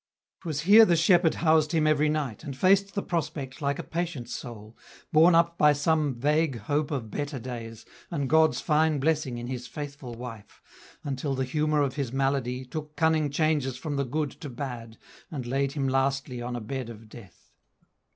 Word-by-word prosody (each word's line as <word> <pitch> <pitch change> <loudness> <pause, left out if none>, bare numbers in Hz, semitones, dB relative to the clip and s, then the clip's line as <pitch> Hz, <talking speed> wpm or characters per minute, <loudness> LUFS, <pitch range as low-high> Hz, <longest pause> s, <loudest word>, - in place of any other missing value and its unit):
W. - - -25
'Twas 145 -1 -2
here 205 +6 +8
the 175 -6 +4
shepherd 170 0 +4
housed 160 -1 +2
him 160 -2 +2
every 155 0 +3
night, 150 -7 -2
And 140 -4 -6
faced 195 +3 +3
the 200 - -1
prospect 145 -6 -4
like 140 0 0
a - - -5
patient 165 -8 -4
soul, 110 -3 -8 0.4
Borne 165 +3 +6
up 170 0 +2
by 150 0 +6
some 145 -1 +1
vague 150 +2 +1
hope 145 +7 -1
of 125 -8 -4
better 145 -1 -3
days, 115 -3 -7 0.2
And 145 -5 -2
God's 160 +2 +4
fine 155 0 +2
blessing 150 -3 0
in 120 - -5
his 125 0 -5
faithful 140 -4 -7
wife, 115 -3 -10 0.4
Until 140 -1 -2
the 130 0 -1
humour 150 +2 +1
of 135 -1 -3
his 135 -5 -2
malady 135 -1 -1
Took 150 +3 -7
cunning 160 -2 +2
changes 145 -3 0
from 150 -3 -4
the 140 - 0
good 145 +3 -2
to 145 - -6
bad, 120 -3 -7 0.3
And 140 -8 -5
laid 135 +2 -1
him 140 -3 -1
lastly 135 -1 0
on 120 0 -4
a 120 - -4
bed 125 +2 -5
of 110 -1 -11
death. 105 -5 -15
140 Hz, 190 wpm, -27 LUFS, 125-155 Hz, 0.4 s, here